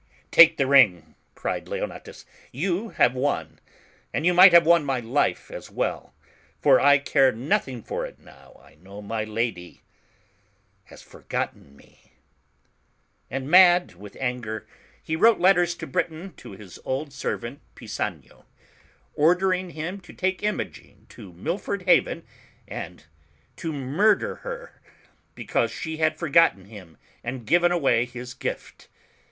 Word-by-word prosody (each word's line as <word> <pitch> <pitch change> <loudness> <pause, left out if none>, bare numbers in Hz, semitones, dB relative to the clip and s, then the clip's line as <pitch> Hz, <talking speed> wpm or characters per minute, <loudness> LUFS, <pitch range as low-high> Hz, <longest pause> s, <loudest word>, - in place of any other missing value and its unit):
((' 65 - -34
Take 170 -1 +7
the 135 - +2
ring," 100 - +4 0.2
cried - - -4
Leonatus, - - -7 0.3
"you 185 - -2
have 125 - +2
won, 130 +3 -2 0.5
and 155 - -2
you 180 - +4
might 180 +1 +9
have 170 -1 +7
won 170 -1 +5
my 135 -3 -1
life 120 +5 -1
as - - -9
well, - - -3 0.5
for - - +5
I 145 +1 +5
care 135 -1 +3
nothing 125 -1 -2
for - - -4
it - - -15
now - - -19
I - - -20
know 100 +3 -11
my 110 +1 -3
lady 110 -5 -4 1.0
has - - -15
forgotten 70 - -6
me." - - -24 1.2
And 135 +2 -4
mad 175 - +6
with 100 +3 -13
anger, 120 -4 -4 0.4
he 160 - -3
wrote 225 +7 +4
letters 175 -1 +3
to - - -7
Britain 160 +7 -4
to - - -11
his 95 -2 -13
old 135 +2 -4
ser 135 - -3
vant, 120 +4 -9 0.2
Pisanio, - - -6 0.7
ordering 180 +4 +2
him 170 +4 -6
to 185 - -15
take 185 0 -2
Imogen 210 0 -5
to 95 - -12
Mil 155 - -4
ford 200 -2 -4
Haven, 175 -2 +2 0.4
and 85 0 -8 0.5
to 165 - -4
murder 155 +10 +1
her, - - -9 0.5
because - - -1
she 160 -2 -6
had 155 0 +1
forgotten 165 - +3
him 100 -6 -14 0.3
and 120 0 -6
given 175 +7 +3
away 135 -9 +2
his 125 +1 -9
gift. - - -7
145 Hz, 145 wpm, -24 LUFS, 115-175 Hz, 1.2 s, might